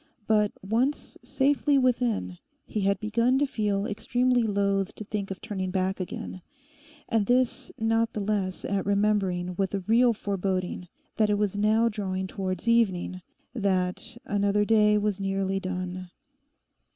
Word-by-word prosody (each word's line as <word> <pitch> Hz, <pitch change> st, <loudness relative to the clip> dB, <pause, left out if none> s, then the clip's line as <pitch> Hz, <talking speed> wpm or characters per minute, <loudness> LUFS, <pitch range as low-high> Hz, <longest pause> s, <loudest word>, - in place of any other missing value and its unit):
But 210 Hz, -1 st, +3 dB
once 240 Hz, +8 st, -1 dB
safely 285 Hz, +1 st, +2 dB
within 240 Hz, -8 st, 0 dB, 0.3 s
he 215 Hz, -, -3 dB
had 195 Hz, 0 st, +1 dB
begun 230 Hz, +5 st, +2 dB
to 290 Hz, -, +3 dB
feel 205 Hz, -6 st, -1 dB
extremely 245 Hz, +4 st, +1 dB
loth 200 Hz, -3 st, 0 dB
to -, -, -7 dB
think 205 Hz, -1 st, -4 dB
of 195 Hz, -, -5 dB
turning 190 Hz, -3 st, -3 dB
back 190 Hz, +1 st, -1 dB
again, 185 Hz, 0 st, -6 dB, 0.7 s
and 220 Hz, -3 st, +1 dB
this 255 Hz, +1 st, +1 dB
not 225 Hz, +1 st, +1 dB
the -, -, -3 dB
less 200 Hz, -2 st, -2 dB
at 200 Hz, -2 st, -1 dB
remembering 200 Hz, -3 st, +1 dB
with 195 Hz, 0 st, 0 dB
a 195 Hz, -, -2 dB
real 235 Hz, +5 st, +4 dB
foreboding 190 Hz, -3 st, -2 dB, 0.3 s
that 215 Hz, -1 st, +3 dB
it 205 Hz, -, +2 dB
was 205 Hz, -1 st, 0 dB
now 215 Hz, +3 st, +3 dB
drawing 190 Hz, -4 st, -2 dB
towards 185 Hz, +1 st, -4 dB
evening, 190 Hz, -6 st, +2 dB, 0.3 s
that 195 Hz, 0 st, -1 dB
another 205 Hz, 0 st, +1 dB
day 210 Hz, -1 st, +4 dB
was 205 Hz, -1 st, 0 dB
nearly 195 Hz, 0 st, -1 dB
done. 185 Hz, -1 st, -5 dB
205 Hz, 145 wpm, -27 LUFS, 190-225 Hz, 0.7 s, real